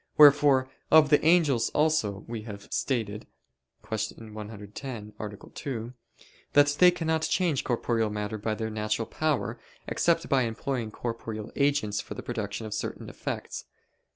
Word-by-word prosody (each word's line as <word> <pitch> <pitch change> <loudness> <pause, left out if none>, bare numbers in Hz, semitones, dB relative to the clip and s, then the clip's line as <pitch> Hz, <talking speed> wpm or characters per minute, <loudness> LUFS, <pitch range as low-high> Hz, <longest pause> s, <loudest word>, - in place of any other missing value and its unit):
Wherefore 145 -3 +7 0.2
of 155 -2 +6
the 150 - +5
angels 155 -7 +4
also 145 -11 +1
we 115 -1 -4
have 105 -2 -9
stated 110 -6 -1 0.6
(Q. 110 0 -4
110, 105 +1 -7
A. 105 -1 -5 0.2
2) 120 -3 -5 0.6
that 145 0 +7
they 180 - +9
cannot 160 -2 0
change 165 -4 +1
corporeal 115 -2 0
matter 105 +1 -3
by 110 +1 -1
their 110 0 -3
natural 110 +1 -1
power, 125 -3 -1 0.3
except 170 -1 +1
by 135 -2 +3
employing 120 0 -2
corporeal 115 -1 -5
agents 140 -8 +1
for - - -8
the - - -7
production 110 -2 -4
of 105 - -5
certain 110 - -4
effects. - - -5
115 Hz, 140 wpm, -28 LUFS, 110-145 Hz, 0.6 s, they